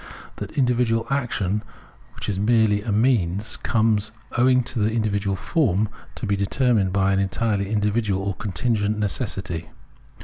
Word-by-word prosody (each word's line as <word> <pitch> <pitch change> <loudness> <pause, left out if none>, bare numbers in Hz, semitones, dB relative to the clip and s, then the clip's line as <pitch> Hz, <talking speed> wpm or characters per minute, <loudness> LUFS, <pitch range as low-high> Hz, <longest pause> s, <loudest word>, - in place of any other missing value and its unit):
That - - -6
individual 125 -3 +2
action, 105 -7 0 0.5
which - - -6
is 100 -2 -1
merely 110 -1 +3
a 110 0 -3
means, 105 -3 +1
comes, 110 -2 +1 0.2
owing 125 +1 +4
to 120 -1 -3
its 110 +2 +1
individual 100 -3 0
form, 105 - +1 0.3
to - - -4
be 100 -1 +1
determined 100 0 +1
by 100 0 +2
an 95 - +2
entirely 100 +1 0
individual 105 -2 0
or 100 0 -1
contingent 105 +2 -1
necessity. 95 -6 -2
105 Hz, 140 wpm, -23 LUFS, 100-115 Hz, 0.5 s, owing